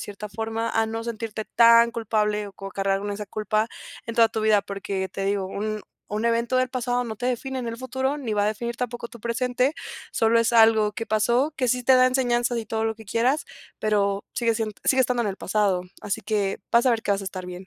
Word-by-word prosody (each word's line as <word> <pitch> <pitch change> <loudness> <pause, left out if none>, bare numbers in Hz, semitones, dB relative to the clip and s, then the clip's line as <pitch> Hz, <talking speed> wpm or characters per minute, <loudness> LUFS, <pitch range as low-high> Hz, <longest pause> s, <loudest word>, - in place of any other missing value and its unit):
cierta 205 +1 -7
forma, 225 +2 -3
a 225 0 +1
no 225 +1 -4
sentirte 225 -2 -5
tan 235 0 +6
culpable, 210 -2 -1
o 200 - -10
co 195 0 -8
cargar 195 0 0
con 205 +1 -4
esa 210 +1 -5
culpa, 215 +2 -1 0.4
en 230 - -4
toda 230 -1 +5
tu 220 - -3
vida. 215 -2 +4
Porque 195 -1 -4
te 195 - -4
digo, 200 -1 0
un 210 +2 -4 0.3
un 210 +2 -2
evento 235 +2 +1
del 255 0 +1
pasado, 245 -1 -1
no 220 -2 -5
te 245 - -3
define 260 +1 -2
en 245 - -4
el 230 - -4
futuro, 260 +3 -2
ni 230 -6 -3
va 205 0 +2
a - - +2
definir 235 +3 -3
tampoco 240 -1 -4
tu 235 - -12
presente. 250 +4 0 0.4
Solo 225 +1 +3
es 230 +1 +1
algo 220 -2 +5
que 225 +2 -5
pasó, 240 +7 +2
que 255 - 0
sí 250 +1 +1
te 260 - +6
da 255 0 +6
enseñanzas, 245 -2 +1
y 225 - -5
todo 220 0 -1
lo 220 0 0
que 220 - -13
quieras, 245 +8 +1 0.4
pero 200 -2 +1
sigue 230 -2 +1
sien 220 -1 -2
sigue 265 - +4
estando 250 -1 +2
en 210 - -1
el 195 - -4
pasado. 195 -3 +1 0.2
Así 200 - -2
que, 205 -2 -1
vas 235 +2 +4
a - - +6
ver 225 -2 0
que 205 - -2
vas 200 - -1
a - - -6
estar 185 -1 -6
bien. 180 +1 -8
225 Hz, 240 wpm, -24 LUFS, 210-240 Hz, 0.4 s, tan